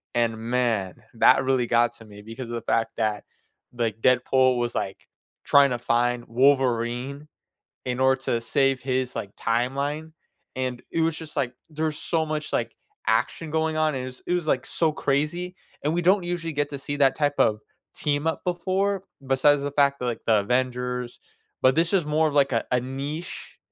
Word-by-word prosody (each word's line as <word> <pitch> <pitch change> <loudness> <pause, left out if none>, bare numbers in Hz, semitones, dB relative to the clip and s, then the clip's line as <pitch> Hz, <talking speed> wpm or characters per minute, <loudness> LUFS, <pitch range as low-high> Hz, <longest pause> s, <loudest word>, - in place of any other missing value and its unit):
and 115 -1 +2
man, 115 -5 -1
that 115 +3 +5
really 130 -2 +1
got 120 0 +3
to 115 - -13
me 105 -1 -13
because 115 +2 -8
of 120 - -4
the 115 - -3
fact 115 0 0
that, 110 -2 -1 0.5
like, 115 -2 -2
Deadpool 130 0 +3
was, 120 0 -1
like, 95 - -4 0.4
tryna 140 -4 +5
find 120 +1 +1
Wolverine 130 +2 +1 0.6
in 125 0 -2
order 130 0 +3
to 115 -3 0
save 135 +3 +1
his, 130 -1 -1
like, 100 0 -6
timeline, 140 +7 -1 0.4
and 125 -1 -3
it 165 - 0
was 165 0 +1
just 160 -1 -8
like, 130 -4 0 0.2
there's 155 -1 -2
so 160 -2 0
much, 155 -1 -3
like, - - -1 0.3
action 160 -2 0
going 160 0 0
on, 155 -1 +2
and 130 - -3
it 130 - -5
was 130 0 -10
it 175 - -1
was, 175 -3 0
like, - - +1
so 160 -2 +1
crazy, 155 +5 -1 0.3
and 150 - +1
we 175 - 0
don't 185 +3 +4
usually 175 -2 -3
get 145 0 -1
to 140 - -5
see 145 +1 -4
that 135 -2 +4
type 145 -1 +1
of 105 0 +3 0.3
team-up 150 +2 -1
before, 190 +2 0 0.2
besides 140 +2 +4
the 145 - -2
fact 140 -1 +2
that, 125 - -3
like, 120 - -3
the 110 -2 +4
Avengers, 125 +1 -2 0.4
but 130 0 +5
this 165 +2 +2
was 180 -6 +2
more 155 +1 +2
of, 145 - -5
like, 140 -2 +3
a 115 - +1
a 125 - +3
niche 140 +6 -6
135 Hz, 185 wpm, -25 LUFS, 120-155 Hz, 0.6 s, that